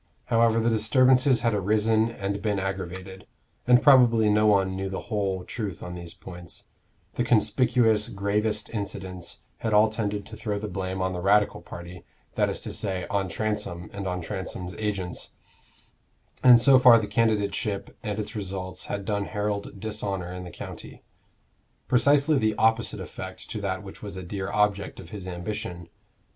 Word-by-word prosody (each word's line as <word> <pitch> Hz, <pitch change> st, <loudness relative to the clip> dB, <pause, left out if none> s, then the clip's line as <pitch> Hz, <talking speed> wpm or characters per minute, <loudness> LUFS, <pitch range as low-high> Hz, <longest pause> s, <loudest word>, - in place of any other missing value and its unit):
However 115 Hz, 0 st, +4 dB
the 115 Hz, +1 st, +2 dB
disturbances 125 Hz, +3 st, +4 dB
had 115 Hz, -1 st, +1 dB
arisen 110 Hz, +3 st, +2 dB
and 100 Hz, -2 st, -4 dB
been 105 Hz, -2 st, 0 dB
aggravated 95 Hz, 0 st, -5 dB, 0.4 s
and 125 Hz, 0 st, +6 dB
probably 120 Hz, -6 st, +6 dB
no 105 Hz, +1 st, +4 dB
one 95 Hz, -2 st, +3 dB
knew 95 Hz, 0 st, -3 dB
the 95 Hz, -, -4 dB
whole 95 Hz, -3 st, -1 dB
truth 105 Hz, -3 st, -5 dB
on 90 Hz, -, -6 dB
these 85 Hz, -1 st, -8 dB
points 90 Hz, -2 st, -9 dB, 0.5 s
the 120 Hz, -, 0 dB
conspicuous, 115 Hz, 0 st, +3 dB
gravest 105 Hz, +1 st, -1 dB
incidents 95 Hz, -4 st, -5 dB
had 110 Hz, -2 st, -1 dB
all 110 Hz, +1 st, +6 dB
tended 105 Hz, -2 st, -3 dB
to 110 Hz, -, -10 dB
throw 105 Hz, -2 st, -3 dB
the 105 Hz, +1 st, -4 dB
blame 95 Hz, -1 st, -3 dB
on 95 Hz, 0 st, -1 dB
the 90 Hz, -, -4 dB
Radical 105 Hz, +2 st, +3 dB
party, 85 Hz, +1 st, -10 dB, 0.3 s
that -, -, +1 dB
is -, -, -3 dB
to -, -, -5 dB
say, 95 Hz, -2 st, -2 dB
on 100 Hz, -2 st, 0 dB
Transome 105 Hz, -2 st, -3 dB
and 100 Hz, -1 st, -4 dB
on 90 Hz, 0 st, -2 dB
Transome's 90 Hz, 0 st, -5 dB
agents; 100 Hz, -5 st, -3 dB, 1.1 s
and 125 Hz, -2 st, +9 dB
so 130 Hz, +2 st, +6 dB
far 125 Hz, -2 st, +8 dB
the 110 Hz, -, -1 dB
candidateship 105 Hz, -1 st, 0 dB
and 105 Hz, -4 st, -3 dB
its 105 Hz, +2 st, -5 dB
results 95 Hz, -2 st, -4 dB
had 100 Hz, -1 st, -4 dB
done 100 Hz, -1 st, -1 dB
Harold 105 Hz, -1 st, -3 dB
dishonor 100 Hz, -4 st, -3 dB
in 90 Hz, 0 st, -7 dB
the -, -, -7 dB
county: -, -, -9 dB, 0.8 s
precisely 140 Hz, +3 st, +4 dB
the 110 Hz, -2 st, +1 dB
opposite 110 Hz, +1 st, +2 dB
effect -, -, -8 dB
to 105 Hz, -, -4 dB
that 95 Hz, 0 st, -3 dB
which 95 Hz, -, -11 dB
was 100 Hz, -2 st, -7 dB
a 95 Hz, -, -6 dB
dear 95 Hz, +2 st, -4 dB
object 105 Hz, -1 st, 0 dB
of 85 Hz, -, -11 dB
his 100 Hz, -4 st, -7 dB
ambition. 90 Hz, -1 st, -5 dB
105 Hz, 165 wpm, -26 LUFS, 95-110 Hz, 1.1 s, and